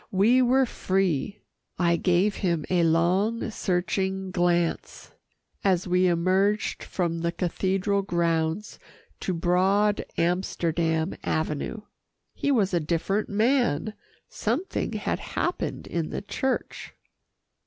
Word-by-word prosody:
We 220 +7 +4
were 260 +2 +4
free. 190 - -1 0.3
I 170 -1 +3
gave 180 +4 +2
him 170 -5 0
a 180 -2 +3
long, 180 +8 +1
searching 190 0 -1
glance, 175 -2 -1 0.5
as 185 -2 +2
we 180 +1 +3
emerged 190 +5 +1
from 170 -2 -2
the 170 0 -1
cathedral 190 +3 0
grounds 170 +1 -1 0.4
to - - -2
broad 190 +5 +2
Amsterdam 170 -1 0
Avenue. 155 +7 -2 0.5
He - - -2
was 205 -8 +2
a 175 - +3
different 170 +6 -1
man. 220 - +1 0.3
Something 255 - -2
had - - -2
happened - - -3
in 165 -2 -3
the - - -5
church. 260 +5 -3
185 Hz, 110 wpm, -26 LUFS, 170-205 Hz, 0.5 s, We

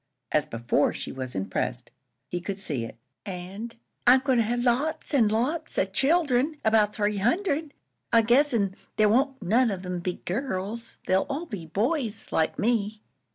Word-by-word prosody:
As 150 - +2
before, 120 +5 +1
she - - -5
was 130 -3 -6
impressed; 95 +6 -2 0.4
he 175 +4 -3
could 195 +2 -4
see 140 - -1
it. 115 - -10 0.3
"An' 195 +4 -6 0.3
I'm 255 +1 +8
goin' 260 -3 +2
to - - +4
have 240 +2 -1
lots 295 +7 0
an' 240 -6 +5
lots 260 +10 -1
of 190 0 0
children 290 - +2
'bout 215 -1 +3
three 210 -1 0
hundred, 305 - 0 0.4
I 230 -1 +5
guess 265 +6 +4
an' 200 -5 0 0.2
there 215 -1 +5
won't 265 +4 +2
none 230 +7 +3
of 190 -2 -4
'em 180 -1 -3
be 180 +1 -2
girls. 215 +1 -3
They'll 190 +1 +2
all 290 +5 -3
be 200 - -7
boys 225 - -1
like 160 - +1
me." 215 -1 0
220 Hz, 170 wpm, -26 LUFS, 185-260 Hz, 0.4 s, I'm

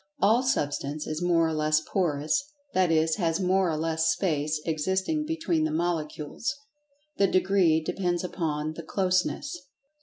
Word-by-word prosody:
All 225 +4 +4
Substance 150 - -1
is 155 +2 -4
more 170 -2 +3
or 160 - -2
less 155 0 +2
Porous, 175 - -1 0.2
that 185 -2 +3
is, 160 0 +2
has 165 -3 0
more 190 -1 +2
or 155 - -1
less 160 0 0
space 155 -3 0
existing 190 - -1
between 195 - 0
the 155 - +1
Molecules—the 230 - -3
degree 185 -4 +3
depends 180 +1 -1
upon 155 -4 -2
the 165 - -7
"closeness." 185 - 0
175 Hz, 140 wpm, -27 LUFS, 155-195 Hz, 0.2 s, All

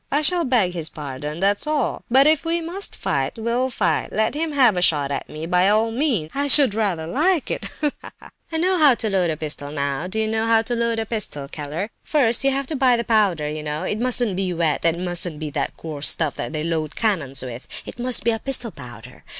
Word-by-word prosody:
I 290 +2 +1
shall 350 +2 +3
beg 225 -9 +2
his 165 -3 -3
pardon, 150 +1 -6
that's 200 +8 +1
all. 300 -5 -1
But 265 +3 +5
if 310 -1 +3
we 335 +1 0
must 345 +4 -3
fight—we'll 235 +3 -1
fight! 180 -10 0
Let 220 +3 0
him 310 +1 -2
have 250 -7 +4
a 180 - -1
shot 145 -5 +3
at 140 - -4
me, 155 +1 -6
by 180 +3 +3
all 220 +2 +2
means; 230 - 0
I 285 +1 -1
should 280 -6 +6
rather 195 -7 -1
like 315 - +1
it. - - -3 0.2
Ha, 295 -1 +1
ha, - - -10
ha! - - -14 0.2
I 320 - -1
know 365 +2 +1
how 290 -5 +6
to 220 -2 -2
load 185 -3 +1
a 155 - -2
pistol 150 -2 -5
now; 140 +2 -2
do 190 - -3
you 220 0 +1
know 220 +1 -1
how 225 -1 +4
to 240 +1 -1
load 235 -1 0
a 225 - -1
pistol, 200 -11 -4
Keller? 155 +8 -5
First, 245 -7 +3
you 275 - +4
have 275 +1 -1
to 305 - -4
buy 255 -3 +3
the 235 - -1
powder, 200 -10 +2
you 155 +1 -4
know; 150 +1 -4
it 210 - -2
mustn't 245 -4 0
be 190 -1 -1
wet, 165 -3 0
and 165 0 +2
it - - -6
mustn't 175 -3 -2
be 155 -1 -5
that - - -3
coarse 155 -3 -1
stuff 160 -4 +2
that - - -5
they 155 -1 -3
load 155 -2 -2
cannons 155 - -1
with—it 125 - -9
must 245 -3 +1
be 230 0 +2
pistol 250 -4 -1
powder. 120 - -12
210 Hz, 240 wpm, -22 LUFS, 155-255 Hz, 0.2 s, should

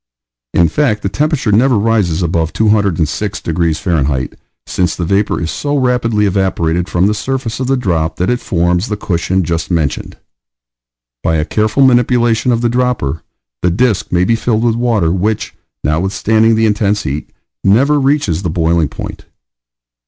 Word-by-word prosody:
In 85 - +5
fact 105 - 0
the 95 - 0
temperature 145 0 0
never 120 +3 +3
rises 100 -6 +1
above 80 -1 -1
206 100 -3 0
degrees 80 -1 -1
F., 70 -7 0 0.4
since 90 -2 -1
the 85 - -3
vapor 100 +4 0
is 85 -1 -3
so 145 0 -2
rapidly 125 -5 +1
evaporated 90 -3 0
from 90 +1 +1
the 105 - +2
surface 125 0 -3
of 130 - -2
the 135 0 +1
drop 85 -9 -1
that 90 +6 0
it 125 - 0
forms 90 +2 0
the 105 - -3
cushion 95 -1 -1
just 85 0 -2
mentioned. 80 -5 -2 1.0
By 80 - 0
a 75 -1 0
careful 110 - +1
manipulation 120 -1 +2
of 115 -1 +1
the 120 - +2
dropper, 120 - -1 0.4
the 90 - +2
disk 110 +3 0
may 90 0 +2
be 115 +5 +2
filled 115 0 0
with 120 -1 +2
water 115 -8 +1
which, 100 +4 -1 0.3
notwithstanding 105 +7 +2
the 110 0 +2
intense 105 -1 +1
heat, 70 +3 -4 0.3
never 135 +9 +3
reaches 135 - +1
the 90 - -2
boiling 80 -2 +1
point. - - -8
100 Hz, 160 wpm, -14 LUFS, 85-115 Hz, 1.0 s, In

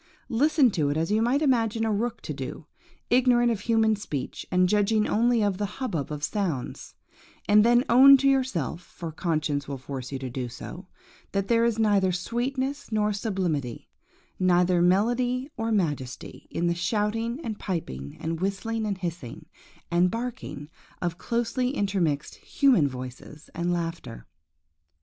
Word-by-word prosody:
Listen 275 +1 +3
to 150 -6 0
it, 145 - -1
as 165 +4 -1
you 215 +1 +3
might 260 +6 +2
imagine 225 -5 +2
a 220 - +1
rook 230 +3 -2
to - - -5
do, - - -7 0.5
ignorant 240 -1 +4
of 225 - -1
human 220 0 +2
speech, 150 -10 -5
and 180 0 +4
judging 210 +2 +2
only 235 0 +2
of 200 -2 0
the 205 - 0
hubbub 185 - -3
of 150 -1 -5
sounds; 175 - -3 0.5
and 210 0 +6
then 240 +2 +5
own 270 +3 +8
to 275 +1 +1
yourself–for 175 - -1
conscience 155 -3 -1
will 140 -1 -4
force 130 0 -7
you - - -4
so 135 - -5
to 130 - -4
do–that 130 +9 -7
there 230 -1 +4
is 235 -1 +1
neither 205 -4 +3
sweetness 260 +9 -3
nor 210 -1 +1
sublimity, 180 - -2 0.5
neither 180 -1 +3
melody 245 +8 +2
or 225 0 -2
majesty, 145 - -3
in 170 - -2
the 170 - +2
shouting, 220 - -1
and 220 -2 -4
piping, 70 - -5
and 165 +1 -3
whistling, 215 +3 -2
and 200 -2 -2
hissing, 170 -9 -6 0.5
and 175 +1 +3
barking, 230 - -5 0.3
of 175 0 -3
closely 240 +3 -1
intermixed 180 - 0
human 250 - +3
voices 130 +3 -9
and 170 +1 -1
laughter. 165 - -4
205 Hz, 150 wpm, -26 LUFS, 165-235 Hz, 0.5 s, own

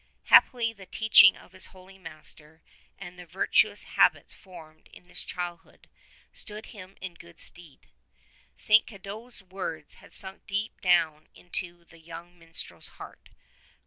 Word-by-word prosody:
Happily 235 -3 +5
the 195 -3 -14
teaching 220 +3 +7
of - - -17
his 185 0 -1
holy 190 +1 -16
master 155 -2 -13 0.3
and 180 -2 -10
the 180 - -9
virtuous 185 +4 +2
habits - - +2
formed 160 -5 -15
in - - -15
his - - -6
childhood 175 -2 -7 0.5
stood 210 +1 -9
him 195 -2 -12
in 185 -2 -6
good 170 0 -16
stead. 165 -6 -9 0.7
St. 215 0 +5
Cadoc's 210 +2 -10
words 180 -5 -6
had - - -16
sunk 190 0 -4
deep 205 +2 -3
down 160 -4 +2
into 175 -1 -4
the 165 -1 -18
young 170 +2 -11
minstrel's 165 0 -1
heart. - - -12
180 Hz, 140 wpm, -28 LUFS, 165-195 Hz, 0.7 s, teaching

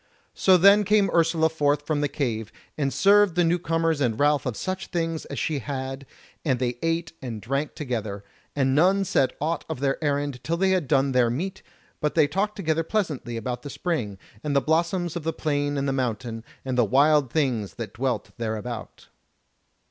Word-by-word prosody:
So 185 -1 +5
then 200 +4 +6
came 205 0 +3
Ursula 165 -1 +3
forth 145 -2 0
from 150 -1 0
the 145 - +2
cave, 115 -7 -3 0.2
and 140 -3 -1
served 200 0 +4
the 175 - +3
new 170 +1 +2
comers 165 -2 0
and 115 -5 0
Ralph 145 -2 +2
of 120 - -3
such 185 0 -3
things 165 -2 -2
as - - -7
she 155 -3 -1
had, 135 +1 -5 0.4
and 130 -5 +1
they 120 -1 -2
ate 165 0 -1
and 120 -4 -5
drank 140 +7 -2
together; 110 -8 -4 0.3
and 135 -2 +2
none 190 +7 +4
said 130 -7 +2
aught 160 +2 -1
of - - -4
their 135 +3 -1
errand 145 -3 -1
till 170 +1 -1
they 190 +1 +2
had 180 -6 +1
done 135 -1 +2
their 125 -2 +3
meat, 175 +11 -3 0.4
but 150 -1 -1
they 155 -3 +5
talked 200 +7 -1
together 160 -4 0
pleasantly 160 - -2
about 125 +1 -4
the 145 - -7
spring, 130 - -3 0.3
and 145 -2 -1
the - - +6
blossoms 170 +3 0
of 170 - -3
the 165 - 0
plain 145 -1 -1
and 140 0 -1
the 135 - 0
mountain, 120 -3 -3 0.2
and 130 -1 -1
the - - +6
wild 140 +3 +3
things 120 - 0
that 115 -2 -6
dwelt 120 -3 -2
thereabout. 110 0 -5
145 Hz, 195 wpm, -25 LUFS, 125-165 Hz, 0.4 s, then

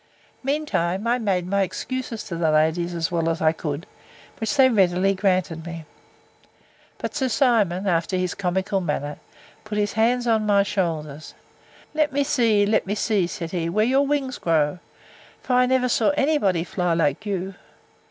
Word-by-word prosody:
Mean 290 +3 -1
time, 185 - -1
I 240 +2 +1
made 190 -6 0
my 200 +2 0
excuses 230 +4 -4
to 175 - -6
the 165 -1 +1
ladies, 160 +3 +1
as 165 +1 -2
well 165 -1 0
as 165 0 -1
I 155 - +3
could, 160 0 -5 0.5
which 225 +6 -1
they 265 -2 +6
readily 195 -4 +3
granted 185 -4 0
me. 165 -1 -7 1.1
But - - -5
Sir 260 -1 0
Simon, 220 -7 +2
after 175 0 0
his 180 -1 -1
comical 190 +1 -1
manner, 150 -3 -3 0.4
put 215 -1 -5
his 205 0 0
hands 240 +3 +2
on 225 -2 +2
my 200 -1 +4
shoulders: 160 -7 -3 0.6
Let 305 -1 +1
me 285 +1 +1
see, 230 -8 +2
let 210 -1 +1
me 205 - -1
see, 205 -4 +1
said 170 -2 -6
he, 170 -2 -2
where 215 +5 +2
your 270 +3 +2
wings 275 -3 -1
grow; 160 0 +1 0.6
for 255 - -2
I 250 0 +4
never 255 0 +2
saw 230 -2 +2
any 300 +2 +2
body 185 - +1
fly 180 -1 -1
like 150 +2 0
you. 190 -1 -3
195 Hz, 175 wpm, -23 LUFS, 170-230 Hz, 1.1 s, they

